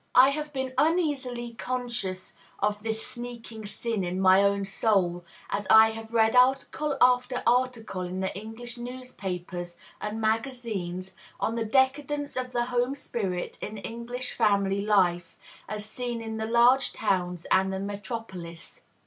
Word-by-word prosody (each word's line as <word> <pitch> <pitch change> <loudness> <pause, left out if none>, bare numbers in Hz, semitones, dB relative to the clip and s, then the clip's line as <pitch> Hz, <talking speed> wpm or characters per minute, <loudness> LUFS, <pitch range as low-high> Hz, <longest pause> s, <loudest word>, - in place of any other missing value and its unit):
I 260 +2 +9
have 300 +1 -4
been 265 -2 -3
uneasily 275 -8 0
conscious 235 -6 -3 0.2
of 205 0 0
this 220 0 -3
sneaking 235 -3 -7
sin 215 0 -2
in 180 +1 -2
my 190 0 +6
own 200 0 +2
soul, 195 -3 +1 0.3
as 205 +1 -2
I 220 0 +8
have 225 0 -8
read 225 0 +3
article 270 +3 +3
after 250 0 +3
article 240 -5 +1
in 180 +1 -4
the 190 0 -2
English 225 +4 -6
newspapers 185 -8 -6 0.2
and 210 +1 -3
magazines 220 -6 -2 0.3
on 225 - 0
the 230 -1 -1
"decadence 280 +4 +1
of 255 -1 -3
the 240 -1 0
home 245 +2 0
spirit 195 -10 -3
in 210 +1 -5
English 235 +4 -5
family 200 -3 +2
life, 180 -5 +2 0.3
as 210 0 -3
seen 240 +2 -4
in 225 -1 -5
the 220 0 -2
large 240 +3 +4
towns 180 -4 -1
and 190 0 +4
the 190 - -2
metropolis." 200 -4 -6
225 Hz, 145 wpm, -27 LUFS, 195-250 Hz, 0.3 s, I